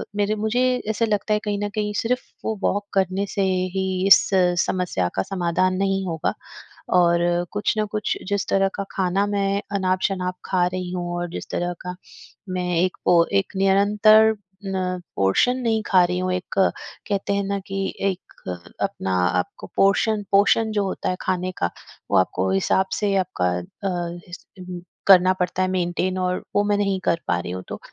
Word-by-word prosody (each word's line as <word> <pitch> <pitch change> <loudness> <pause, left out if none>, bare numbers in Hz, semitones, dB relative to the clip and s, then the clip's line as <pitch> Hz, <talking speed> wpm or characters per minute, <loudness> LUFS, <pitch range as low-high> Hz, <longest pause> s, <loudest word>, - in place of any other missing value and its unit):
मेरे 205 +1 +1
मुझे 220 +4 0 0.3
ऐसा 220 +1 +1
लगता 215 0 0
है 210 - +2
कहीं 205 -1 -2
न 205 - -1
कहीं 210 -1 -1
सिर्फ 250 +2 0 0.2
वो 220 - -1
वॉक 205 +1 0
करने 195 +1 +1
से 200 - 0 0.3
ही 190 - +1 0.2
इस 195 - +9 0.5
समस्या 180 - -1
का 95 - +1
समाधान 185 0 0
नहीं 195 0 0
होगा 165 -3 -1 0.7
और 175 0 +2
कुछ 205 +2 0
ना 215 - +1
कुछ 210 - -1
जिस 200 0 -1
तरह 195 0 +3
का 200 - -2
खाना 190 +1 +1
मैं 200 0 0
अनाप-शनाप 185 -1 0
खा 180 -2 +2
रही 180 0 -4
हूँ 175 -1 -3
और 175 0 -3
जिस - - -7
तरह 175 0 -1
का 180 0 -6 0.6
मैं 180 -1 -2
एक 185 +1 0
पो 170 -1 +6 0.2
एक - - -22
निरंतर 210 +3 +5 0.3
ना 185 -1 -2 0.2
पोर्शन 95 - +2
नहीं 225 -3 0
खा 185 -2 +5
रही 180 +1 -2
हूँ, 185 0 -1
एक 185 +1 -5
कहते 200 +1 -1
हैं 200 0 0
ना 200 0 -1
कि 195 0 -2 0.2
एक 185 -1 -7 0.5
अपना 95 - -2 0.3
आपको 90 - -6
पोर्शन 205 +2 +3
पोर्शन 205 +3 +4
जो 210 -1 +1
होता 190 - -2
है 185 - 0
खाने 185 0 -1
का 85 - 0 0.4
वो - - +4
आपको 95 0 +1
हिसाब 95 - +2
से 205 -2 0
आपका 90 - -1
अ, - - -7 1.4
करना 185 -1 +7
पड़ता 180 +1 -1
है 185 - +1
मेंटेन 185 +1 -1
और 180 0 -1
वो 205 - +4
मैं 205 - +2
नहीं 195 -2 0
कर 170 - +2
पा 85 - +1
रही 90 0 -5
हूँ। 90 0 -5
तो - - -6
190 Hz, 175 wpm, -23 LUFS, 180-205 Hz, 1.4 s, इस